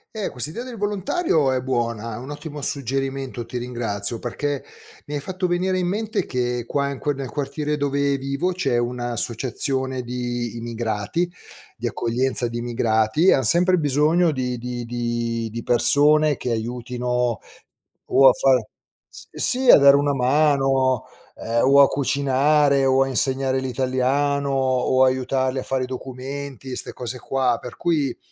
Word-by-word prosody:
Eh, 210 - -2
quest'idea 150 - -5
del 250 -3 -8
volontario 200 - 0
è 130 -1 0
buona, 115 -3 -2
è - - -6
un 130 +4 -8
ottimo 145 0 -7
suggerimento, 135 -2 -3
ti 125 +2 -6
ringrazio 115 -3 -3
perché, 140 +3 -3 0.4
mi 150 - -5
hai - - -1
fatto 185 +4 -3
venire 185 +1 0
in 180 - 0
mente 215 +3 -2
che 125 -1 -2
qua 140 +1 -1
in 140 - -5
que 145 - -1
nel 135 -2 -6
quartiere 150 +1 -3
dove 140 0 0
vivo 140 +7 -2
c'è 135 -10 0
un'associazione 125 +2 -2
di 120 -1 -4
immigrati 115 +7 -2 0.5
di - - -2
accoglienza 120 +1 -1
di 120 0 -5
immigrati, 115 - +1
e - - +8
han 135 - +1
sempre 180 - +3
bisogno 155 +3 +2
di 125 -3 -2
di 120 0 -5
di 120 -1 -2
di 115 +1 -5
persone 150 +4 +4
che 125 - -4
aiutino 125 +1 -2 0.7
o 135 -1 +6
a - - +4
far 130 -5 +2 0.4
s - - -11
sì 255 0 +3
a - - +9
dare 140 0 +7
una 145 0 +1
mano, 135 -1 +2 0.3
ehm, 115 +1 -1
o 140 +1 +7
a 140 - +7
cucinare, 140 +1 +2
o 135 0 +4
a - - -3
insegnare 130 0 0
l'italiano, 130 +2 0
o 130 -1 +2
aiutarli 130 0 0
a - - -5
fare 130 -1 -1
i - - -1
documenti, 130 0 -7
ste - - -5
cose 125 0 -6
qua, 125 -2 0
per 125 - -9
cui 150 -7 0
130 Hz, 155 wpm, -22 LUFS, 120-145 Hz, 0.7 s, a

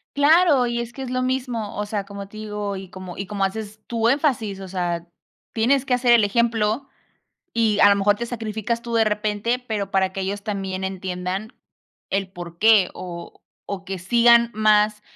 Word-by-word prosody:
Claro, 290 -3 +5
y 235 0 -1
es 235 0 -6
que 270 - -7
es 260 - -5
lo 255 0 -1
mismo. 250 -4 -2
O 210 - -1
sea, 205 -1 -3
como 200 0 -8
te 215 +2 -13
digo, 210 -2 -4
y 190 -1 -8
como 185 -1 -9
y 195 - -5
como 195 0 0
haces 215 +2 -5
tú 230 -1 +1
énfasis, 240 -8 0
o 190 - -7
sea, 175 -2 -3 0.5
tienes 255 +4 +2
que 255 - 0
hacer 245 -1 +3
el 230 -3 +6
ejemplo 230 +3 0 0.6
y 225 -2 +2
a 205 - +8
lo 200 - +4
mejor 205 +1 +3
te 235 - -3
sacrificas 225 0 -3
tú 235 0 -5
de 225 -1 +4
repente, 210 +3 0
pero 215 -6 -4
para 190 -1 +2
que 195 - -3
ellos 200 +2 -3
también 195 -2 -3
entiendan 190 +3 -4 0.6
el 195 -1 -1
porqué 185 +3 +3
o 170 -1 -8 0.3
o 195 -1 -5
que 190 -1 -5
sigan 235 +4 +5
más 210 0 +3
210 Hz, 190 wpm, -22 LUFS, 195-235 Hz, 0.6 s, a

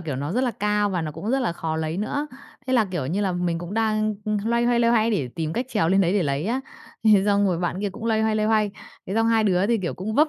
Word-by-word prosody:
kiểu, 155 -6 -4
nó 145 +5 -3
rất 250 - +1
là 250 - +1
cao 210 -1 0
và 180 -3 -1
nó 155 -1 -4
cũng 215 +9 -4
rất 270 - +2
là 235 -9 0
khó 160 -1 -3
lấy 160 +1 -2
nữa. 285 +9 -2 0.4
Thế 260 - -1
là, 240 -4 +4
kiểu 175 -9 -3
như 185 +8 -1
là, 195 -2 0
mình 175 -1 -1
cũng 175 +4 -6
đang, 215 -1 +1
ưm, 215 0 0
loay 235 +1 +1
hoay, 240 0 +2
loay 235 - +3
hoay 230 -1 +3
để 150 - -1
tìm 160 -2 -3
cách 245 +7 -2
trèo 210 -9 +1
lên 195 +2 +4
đấy 180 -1 +2
để 205 - +2
lấy 140 0 -1
á, 245 +4 0 0.4
thế 210 -3 +6
xong 205 -1 +3
rồi 180 -3 0
bạn 180 +2 -2
kia 205 - -1
cũng 220 +4 -9
loay 220 -1 +1
hoay, 220 0 +1
loay 215 0 +1
hoay, 215 -2 +2 0.4
thế 195 - -4
xong 225 +1 +2
hai 225 -1 +3
đứa 190 -1 +2
thì, 230 +1 +2
kiểu, 180 -4 -3
cũng 210 +4 -4
vấp 305 +5 +4
205 Hz, 310 wpm, -24 LUFS, 175-225 Hz, 0.4 s, thế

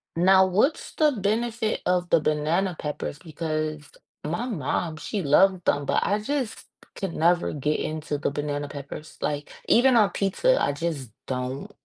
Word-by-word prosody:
Now, 190 +2 +6
what's 210 - +1
the 305 -1 +4
benefit 220 0 -1
of 180 -1 +1
the - - +5
banana 155 +5 0
peppers 150 -1 -4
because 155 -2 -4 0.3
my 170 +11 -2
mom, 160 - -2
she 200 +6 -3
loved 180 +4 +4
them, 145 0 +1
but, - - +1
I 205 +1 +1
just 255 +1 -3 0.3
could 190 -4 -4
never 175 +2 +2
get 150 +1 -1
into 155 -1 -3
the 140 - -1
banana 145 0 -3
peppers, 145 +2 -9
like, 145 0 -2 0.2
even 255 +2 +5
on 215 -4 +5
pizza, 205 - +1
I - - +1
just 145 -4 -3 0.2
don't 130 +9 -4
170 Hz, 155 wpm, -25 LUFS, 150-200 Hz, 0.3 s, Now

